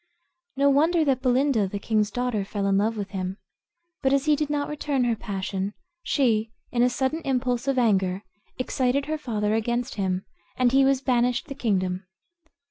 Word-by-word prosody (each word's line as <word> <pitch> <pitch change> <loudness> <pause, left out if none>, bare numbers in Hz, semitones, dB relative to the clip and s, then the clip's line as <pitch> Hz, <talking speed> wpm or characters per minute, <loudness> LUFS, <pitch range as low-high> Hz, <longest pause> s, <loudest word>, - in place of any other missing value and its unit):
No 280 +1 +4
wonder 320 +4 +3
that 265 -3 +1
Belinda, 255 -4 +2
the 200 - -4
king's 210 0 +1
daughter, 245 -2 -1
fell 200 0 -3
in 195 0 +2
love 220 +2 0
with 200 -1 -4
him; 190 -1 -3 0.6
but 265 - +2
as 275 0 +2
he 305 -1 +4
did 300 0 -2
not 290 -1 -1
return 290 -3 -1
her 235 -2 +1
passion, 195 -1 -4 0.3
she, 225 -9 +1 0.2
in 240 - +1
a 250 - +5
sudden 265 +6 -1
impulse 250 -1 -1
of 275 -1 +1
anger, 195 -5 +2 0.3
excited 255 +2 0
her 310 +1 -3
father 215 -6 -1
against 235 +3 -1
him, 185 0 -1 0.3
and 250 -1 +3
he 270 +1 +5
was 270 -1 +3
banished 250 +2 +1
the - - -4
kingdom. 185 -7 -1
245 Hz, 180 wpm, -25 LUFS, 205-275 Hz, 0.6 s, a